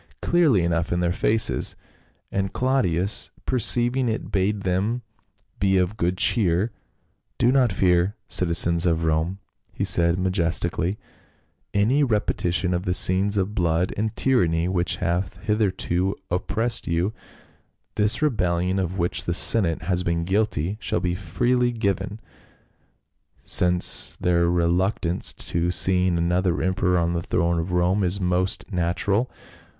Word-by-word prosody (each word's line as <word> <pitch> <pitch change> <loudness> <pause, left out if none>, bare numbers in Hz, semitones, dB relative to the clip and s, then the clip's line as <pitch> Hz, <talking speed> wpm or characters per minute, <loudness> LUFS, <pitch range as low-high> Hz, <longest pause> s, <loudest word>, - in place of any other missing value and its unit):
217 - - -3
clearly 155 - +4
enough 85 -1 0
in 85 - +1
their 85 -1 +1
faces, 110 +4 0 0.6
and 95 0 -1
Claudius 100 -8 0 0.2
perceiving 120 +1 +1
it 110 - -3
bade 100 +2 0
them 100 +6 -1 0.6
be 95 -1 +3
of 90 +3 +1
good 90 -2 0
cheer. 95 +1 +1 0.3
" - - -46
Do 120 - +3
not 130 -4 +3
fear, 90 +1 +2
citi 90 - -2
zens 85 +1 +1
of 80 -1 +1
Rome," 80 +4 0 0.3
he - - -3
said 85 0 +2
majestically, 90 0 0 0.7
"any 115 +9 +3
repetition 90 - 0
of 90 +1 -2
the 90 - 0
scenes 100 +3 +1
of 100 +1 0
blood 85 -2 +1
and 110 +2 -2
tyranny 85 -11 +2
which 90 -1 -1
have 90 +1 -2
hith 105 +1 0
erto 95 -2 0 0.2
oppressed 110 +6 -1
you; 85 +5 0 0.8
this 110 +7 +1
rebellion 90 - +1
of 95 0 -2
which 85 0 -1
the 85 - -1
senate 90 -7 +1
has 90 +1 0
been 85 -1 -1
guilty 100 -1 0
shall - - -1
be 90 -1 -1
freely 120 +7 +1
forgiven, 105 -1 -2 1.2
since 90 -1 0
their 85 -1 +2
reluctance 85 +1 0
to 85 +1 -2
seeing 90 0 +2
another 85 +1 +1
emperor 95 -1 +1
on 85 0 +1
the 85 - -1
throne 85 0 0
of 85 +3 -3
Rome 90 +3 +2
is 90 +2 -1
most 90 0 0
natural. 95 +6 0
90 Hz, 140 wpm, -24 LUFS, 85-105 Hz, 1.2 s, clearly